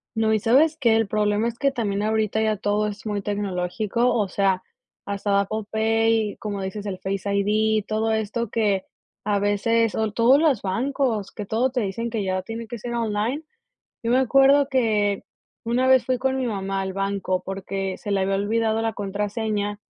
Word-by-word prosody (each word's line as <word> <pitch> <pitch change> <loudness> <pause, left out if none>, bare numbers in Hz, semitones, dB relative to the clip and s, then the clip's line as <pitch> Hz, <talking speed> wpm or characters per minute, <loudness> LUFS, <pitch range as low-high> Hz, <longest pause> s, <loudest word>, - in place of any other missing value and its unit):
No, 220 0 +2
y 215 - +2
sabes 285 +9 +3
que 235 -6 +3
el 225 -1 +2
problema 210 +2 +1
es 235 0 -5
que 275 -1 +2
también 205 -6 -2
ahorita 220 0 0
ya 215 -1 +1
todo 210 +1 0
es 210 +1 -7
muy 205 -2 -2
tecnológico. 205 +4 -1
O 210 -4 +1
sea, 190 -1 +1 0.4
hasta 200 0 0
Apple 215 +2 -3
Pay, 225 -1 +1
como 205 -2 -4
dices, 205 +2 -5
el 185 -2 -3
Face 195 0 -3
ID. 215 +1 +2
Todo 220 +1 0
esto 220 +1 -1
que 205 -4 0 0.4
a 205 -1 +1
veces 210 +2 +1
o 220 -1 0
todos 240 +6 +5
los 290 -9 +3
bancos, 230 +1 -1
que 210 - -6
todo 230 +6 +1
te 255 - -1
dicen 225 +4 -3
que 220 -3 -2
ya 185 0 -1
tiene 225 +4 -7
que 235 0 -7
ser 240 +2 -4
online. 230 +6 -1 0.6
Yo 230 - -1
me 250 - +4
acuerdo 275 +2 +5
que 210 -6 +1 0.4
una 245 +3 +1
vez 260 -2 +5
fui 255 - +1
con 265 +1 0
mi 255 - -1
mamá 195 -3 -2
al 190 0 -3
banco 195 -2 -1
porque 195 0 -4
se 205 - -6
le 195 -1 +1
había 195 +1 +1
olvidado 220 +2 0
la 225 -1 -1
contraseña, 205 +1 -2
215 Hz, 190 wpm, -24 LUFS, 200-230 Hz, 0.6 s, todos